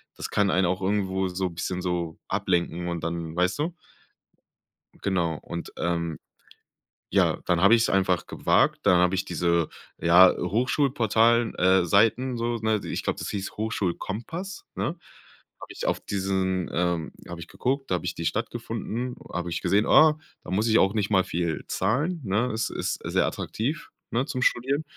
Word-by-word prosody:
das - - -6
kann 100 -2 +2
einen 95 0 +2
auch 90 +2 -1
irgendwo, 95 -1 0
so, 90 0 -2
bisschen, 90 +2 -4
so, 85 -2 -2
ablenken 90 -3 -1
und 85 -2 -3
dann, 85 -1 -4
weißt 90 +9 +1
du? 165 +3 -1 1.3
Genau 85 -5 0
und, 85 0 -7
ähm, 85 -2 -2 0.9
ja, - - +3
dann 90 -1 +2
habe 100 +5 +7
ich's 115 - +2
einfach 95 -2 +1
gewagt, - - +2
dann 90 - +5
habe 90 +1 +3
ich 95 - 0
diese, 85 -2 +1 0.3
ja, 90 +2 +7
Hochschulportalen 115 - +2
äh, 95 0 +4
Seiten, 115 +7 +3
so, 120 0 -1
ne? 110 -2 0
I - - -7
ich - - -3
glaube, - - -2
das - - -4
hieß 100 -1 -4
„Hochschulkompass“, 110 - -4
ne? 170 - -2 0.6
Habe - - -9
ich - - -5
auf - - 0
diesen, 95 -2 -1
ähm 85 -2 -1 0.2
habe 90 - -7
ich 85 - -8
geguckt. 135 -1 -2
Da - - +2
habe - - -7
ich 85 - -2
die 85 - -3
Stadt 110 +6 -1
gefunden, 120 +1 -4 0.2
habe 90 0 -3
ich 85 - -3
gesehen, 105 +2 +2
ah, 155 -1 +6 0.3
da - - -8
muss 105 +5 +1
ich 110 - +5
auch 95 - +3
nicht 105 -3 0
mal 95 -2 +4
viel 85 -1 -2
zahlen, 145 - 0
ne? 105 +6 0
Ist 110 +1 -1
ist - - -3
sehr - - +1
attraktiv, 140 +9 -3 0.2
ne, 125 +4 0
zum 130 -4 -3
Studieren. 135 +5 +1
95 Hz, 175 wpm, -26 LUFS, 90-115 Hz, 1.3 s, habe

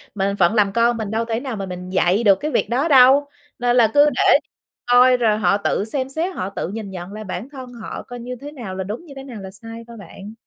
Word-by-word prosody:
Mình 200 0 -1
phận 185 0 +3
làm 205 -2 +3
con 235 +1 +2
mình 220 -2 -4
đâu 225 +1 -1
thể 225 0 -2
nào 255 -3 -5
mà 195 - -4
mình 180 -1 -7
dạy 185 +3 +1
được 200 -3 +6
cái 305 - -3
việc - - 0
đó 265 +7 +1
đâu. 270 0 +6 0.3
Nên 245 0 +1
là 225 -3 +4
cứ 290 +1 +6
để 255 - +4 0.5
coi 250 +1 +5
rồi 220 -3 +2
họ 200 -1 +2
tự 200 0 -1
xem 260 +3 -3
xét, 335 +6 -3
họ 185 - -3
tự 195 - -4
nhìn 210 0 -6
nhận 180 +1 -8
lại 215 0 -7
bản 200 +6 -6
thân 260 -3 -10
họ 230 -2 -8
coi 245 0 -9
như 250 +1 -6
thế 290 +1 -8
nào 230 -10 -7
là 190 - -3
đúng, 215 - -7
như 285 - -12
thế 270 - -8
nào 245 -6 -9
là 190 0 -8
sai 225 +4 -10
thôi 235 - -11
bạn. 200 +2 -11
225 Hz, 270 wpm, -20 LUFS, 200-255 Hz, 0.5 s, được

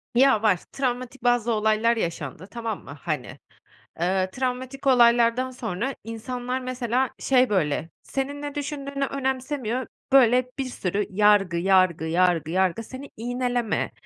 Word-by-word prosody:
Ya, 260 -3 +5
var. 195 -5 +4
Travmatik 255 -1 -3
bazı 245 -1 +2
olaylar 220 +1 +2
yaşandı, 165 - -4
tamam 230 -3 -4
mı, 145 +2 -10
hani. 155 -7 -4 0.6
Eee, 185 +2 +1
travmatik 260 +3 -4
olaylardan 240 0 +4
sonra 240 +1 -3
insanlar, 245 +3 -4
mesela, 255 0 -1
şey 255 -2 +3
böyle, 165 -4 0
senin 280 +2 -4
ne 290 -1 -5
düşündüğünü 280 -1 -3
önemsemiyor, 260 -2 -2 0.3
böyle, 250 -1 +5
bir 270 - 0
sürü 205 -5 -2
yargı, 200 -3 +4
yargı, 185 -2 +3
yargı, 170 -2 +2
yargı, 190 +4 +1
seni 260 +5 -9
iğneleme. 245 -1 -1
235 Hz, 130 wpm, -25 LUFS, 195-260 Hz, 0.6 s, Ya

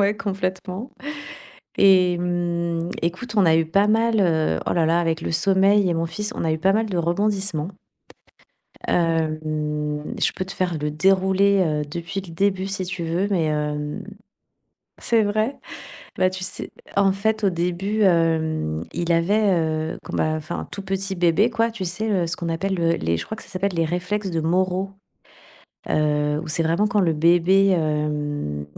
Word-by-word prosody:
ouais 200 +1 +2
complètement, 190 +2 -4 0.9
et 185 -3 +5
mmh, 170 -1 -1
écoute, 185 +7 -3
on 195 - +5
a 160 -1 +5
eu 165 - +3
pas 195 +6 +2
mal, 225 0 +2
heu 160 - +2
oh - - 0
là 165 -2 +2
là, 165 +2 +3
avec 165 -2 0
le - - -3
sommeil 195 +2 +3
et - - +1
mon 165 0 -1
fils, 210 +6 -4
on - - -3
a 160 - +1
eu 155 - 0
pas 190 +3 +3
mal 220 +1 +1
de 185 - -2
rebondissements. 190 -1 0 1.2
Hem, 165 -2 +1 0.8
je - - +2
peux 185 - -4
te 190 - -7
faire 180 -4 -1
le 150 0 -2
déroulé, 190 +4 +3
heu, 150 -2 0
depuis 170 +6 -5
le 180 -3 -11
début 190 +2 0
si 195 -1 -3
tu 180 -1 -4
veux, 170 +4 0
mais 180 -6 +1
hem 150 -1 -2 1.0
c'est 225 -2 +3
vrai? 215 +6 0 0.6
Et - - -8
bah, 185 - +4
tu 185 0 -7
sais, 185 - -3 0.3
en 200 -1 +4
fait, 215 +3 -1
au 200 - +4
début 180 +5 -1
hem, 160 - +1
il 170 0 -1
avait, 175 +6 +2 0.2
heu 160 0 -2
quand - - -6
bah, 155 - +1
enfin, 155 +2 -5
tout 200 - -5
petit 195 0 -3
bébé, 175 +5 +3
quoi, 230 0 +1
tu 225 -4 -6
sais 185 +6 -3
le 185 -6 +1
ce 165 - -2
qu'on 170 - -4
appelle 190 +4 -1
le 165 -2 +1
les 85 - 0
je - - -5
crois 220 - -5
que 220 - -11
ça - - -14
s'appelle 190 0 -2
les 165 - +1
réflexes 180 +5 -2
de 165 -2 -1
Moro, 185 +3 0 1.0
heu, 150 0 +1
où - - -8
c'est 165 +2 0
vraiment 170 +6 +2
quand 210 - 0
le 170 -4 +2
bébé 175 +5 +4
hem, 150 - -1
175 Hz, 185 wpm, -23 LUFS, 165-195 Hz, 1.2 s, et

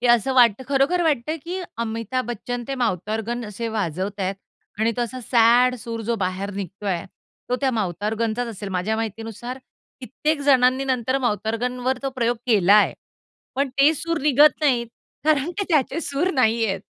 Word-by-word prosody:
की 245 - 0
असं 240 +3 +3
वाटतं, 240 -2 +5
खरोखर 280 +6 +2
वाटतं, 305 -1 0
की 360 +3 -4 0.2
अमिताभ 230 +2 -2
बच्चन 240 +1 -4
ते 275 - -1
माउथॉर्गन 225 +1 -2
असे 210 +3 -4
वाजवतायेत 195 -1 -2 0.4
आणि 225 +1 +2
तो 245 - +1
असा 250 +2 -5
सॅड 240 +1 +4
सूर 230 -1 -5
जो 235 +2 -1
बाहेर 190 0 -2
निघतोय. 195 -2 -4 0.4
तो 250 - +1
त्या 270 -2 +2
माउथॉर्गनचाच 220 +3 -1
असेल 205 -2 -6
माझ्या 190 +4 -1
माहितीनुसार 225 +3 -5 0.4
कित्येक 300 +4 -2
जणांनी 265 -1 +4
नंतर 260 0 0
माउथॉर्गनवर 245 +2 -1
तो 270 - -1
प्रयोग 240 -2 0
केलाय, 210 -2 +5 0.6
पण 275 +1 0
ते 275 +4 +4
सूर 335 +2 -2
निघत 295 +2 +5
नाहीत. 250 -5 +2 0.4
कारण 305 0 +2
की 400 - +1
त्याचे 305 -1 +1
सूर 295 +4 -1
नाहीयेत. 225 -5 +2
240 Hz, 150 wpm, -23 LUFS, 220-265 Hz, 0.6 s, वाटतं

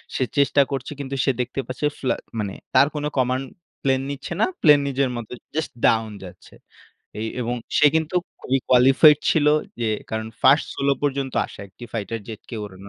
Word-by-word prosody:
সে - - +1
চেষ্টা 140 0 +4
করছে 135 0 -4
কিন্তু 140 -1 -4
সে 135 - +4
দেখতে 125 +2 -4
পাচ্ছে 130 +3 -3
ফ্লা 130 - 0 0.2
মানে 100 -2 -3 0.2
তার 140 - +6
কোনো 150 0 -2
কমান্ড 130 +1 +1 0.4
প্লেন 130 -1 +1
নিচ্ছে 140 +4 -6
না। - - +6 0.2
প্লেন 150 -2 +7
নিজের 135 -1 0
মতো 115 -2 -7 0.2
জাস্ট 160 0 -2
ডাউন 110 -1 +2
যাচ্ছে। 90 - -13 0.7
এ - - -4 0.2
এবং 120 0 -2 0.2
সে 150 - +6
কিন্তু 160 +2 0 0.2
খুবই 135 +1 0
কোয়ালিফাইড 135 +4 +6
ছিল 150 -3 +2 0.3
যে 115 - 0 0.2
কারণ 110 0 -3 0.2
ফার্স্ট 135 +3 +5
সোলো 140 0 +2
পর্যন্ত 140 -2 -1
আসা - - -12
একটি 95 +6 -12
ফাইটার 115 0 -4
জেটকে 110 +1 -9
ওড়ানো 100 0 -11
130 Hz, 175 wpm, -23 LUFS, 115-140 Hz, 0.7 s, প্লেন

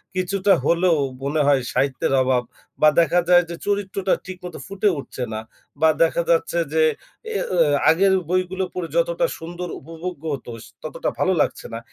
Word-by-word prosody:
কিছুটা 195 +2 +2
হলেও 170 0 +3 0.3
মনে 150 +3 0
হয় 140 -2 +4
সাহিত্যের 135 0 0
অভাব 125 -1 +1 0.4
বা 155 - +8
দেখা 170 +1 +3
যায় 175 0 +7
যে, 170 - -5
চরিত্রটা 195 -1 0
ঠিক 185 -1 -7
মতো 175 - -7
ফুটে 200 +1 0
উঠছে 130 - -6
না। 110 - -3 0.4
বা 160 - +6
দেখা 165 +1 +1
যাচ্ছে 170 0 +2 0.2
যে 160 0 +4 0.4
অ্যা 450 -1 -2 0.5
আগের 190 +4 +4 0.2
বইগুলো 185 +1 0
পড়ে 180 -2 -3
যতটা - - +2
সুন্দর 175 +2 -6
উপভোগ্য 165 +1 -7
হত 135 - -7 0.4
ততটা 155 - -3
ভালো 185 - +2
লাগছে - - -2
না। 115 - -4
175 Hz, 160 wpm, -22 LUFS, 155-190 Hz, 0.5 s, বা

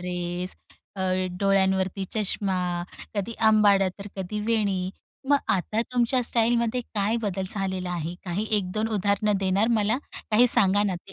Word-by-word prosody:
Dress, 180 0 -4 0.4
अ, - - -5 0.4
डोळ्यांवरती 190 -1 +1
चष्मा, 200 -2 0 0.6
कधी 205 +3 -2 0.2
अंबाडा 205 -3 +4
तर 200 - -8
कधी 195 +3 -4
वेणी. 200 -5 0 0.4
मग 285 - +6 0.2
आता 215 +4 -1
तुमच्या 245 +1 +2
स्टाईलमध्ये 235 +1 +1
काय 210 +2 +1
बदल 190 -2 -2
झालेला 190 -3 -2
आहे? 170 -1 -3
काही 190 +4 -2
1-2 210 +4 -2
उदाहरणं 205 0 +1
देणार 195 +4 +1
मला? 215 +4 +1 0.3
काही 225 +3 +5
सांगा 205 -4 +6
ना 195 -3 0
ते 175 +2 -11
200 Hz, 140 wpm, -25 LUFS, 190-215 Hz, 0.6 s, मग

